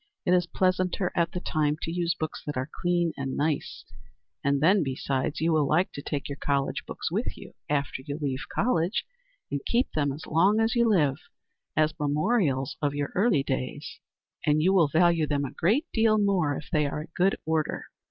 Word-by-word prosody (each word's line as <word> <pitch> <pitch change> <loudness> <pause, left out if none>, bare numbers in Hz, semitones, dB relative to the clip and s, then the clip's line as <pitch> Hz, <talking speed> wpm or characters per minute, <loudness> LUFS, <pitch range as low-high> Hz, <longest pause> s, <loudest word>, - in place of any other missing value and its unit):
It - - +2
is 180 -1 +3
pleasanter, 185 0 0
at 170 -1 +1
the 180 - -3
time, 150 -3 0
to 165 - -2
use 170 0 0
books 155 0 -4
that 145 - -3
are 130 +4 -3
clean 175 -2 +1
and 135 -1 -3
nice, 150 0 -2 0.6
and 140 0 +2
then, 185 +7 +4
besides, 135 0 -2
you 165 +1 +2
will 150 -3 +3
like 175 +6 +2
to 140 - -7
take 140 -1 -3
your 140 0 -6
college 140 -1 0
books - - -4
with - - -2
you, - - -11 0.2
after 140 -2 -1
you 145 +2 -5
leave 140 -2 -2
college, 195 -4 +1 0.5
and 140 -1 -2
keep 240 +2 +1
them 145 -2 0
as 145 +3 -7
long 190 +7 +3
as 225 0 +2
you 235 -1 +3
live, 150 -9 +3 0.6
as 155 0 +3
memorials 150 - +1
of 145 -1 0
your 145 -1 -2
early 190 - +3
days, 135 +1 -4 0.4
and 150 0 +3
you 190 +3 +4
will 175 -5 +5
value 165 +1 +3
them 145 -1 0
a - - -5
great 225 - +2
deal 220 -1 +4
more 190 -8 +2
if 150 - -8
they 150 -3 +2
are 150 +1 -3
in 155 - -10
good 190 +2 +3
order." 160 -1 -1
155 Hz, 200 wpm, -27 LUFS, 145-180 Hz, 0.6 s, will